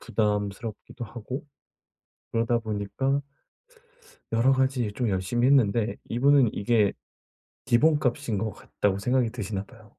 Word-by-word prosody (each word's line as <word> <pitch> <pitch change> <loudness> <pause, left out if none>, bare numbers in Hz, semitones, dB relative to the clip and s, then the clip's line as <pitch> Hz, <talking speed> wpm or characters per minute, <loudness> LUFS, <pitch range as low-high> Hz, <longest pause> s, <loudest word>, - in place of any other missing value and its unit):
부담스럽기도 105 +2 -2
하고 120 +5 -7 0.9
그러다 115 +1 +1
보니까 110 +6 -1 1.1
여러 115 +4 +4
가지 130 -4 +1
좀 120 -2 -1
열심히 100 +6 +1
했는데 115 -5 +3
이분은 135 0 +4
이게 105 -1 +2 0.7
기본값인 130 -3 +2
것 110 +2 -1
같다고 100 -1 -2
생각이 125 +2 +1
드시나 105 -4 -4
봐요. 110 -2 -18
115 Hz, 275 characters per minute, -26 LUFS, 105-130 Hz, 1.1 s, 여러